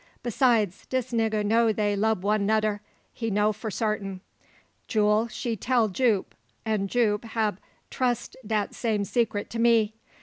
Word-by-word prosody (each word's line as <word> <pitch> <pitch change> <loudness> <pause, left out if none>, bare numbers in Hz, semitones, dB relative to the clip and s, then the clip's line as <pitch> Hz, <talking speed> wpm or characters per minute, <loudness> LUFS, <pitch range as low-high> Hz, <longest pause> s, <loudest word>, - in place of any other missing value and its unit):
Besides, 230 -5 +1
dis 255 -1 -2
nigga 220 -2 +1
know 225 +2 +3
dey 205 -1 0
lub 215 -2 +1
one 210 0 +2
noder 215 -1 +1 0.3
he 230 -2 -3
know 210 +1 +2
fo 220 +2 -6
sartin. 200 -3 -2 0.7
Jule, 215 +1 +2
she 235 0 -3
tell 230 +1 +1
Jupe; 215 -1 +1 0.3
and 210 -3 0
Jupe 215 -3 +1
hab 220 -3 -1 0.3
trussed 245 -3 -1
dat 210 -1 -1
same 220 -4 -1
seecret 220 -1 -1
to 230 - -5
me. 230 -2 +4
220 Hz, 145 wpm, -26 LUFS, 210-230 Hz, 0.7 s, me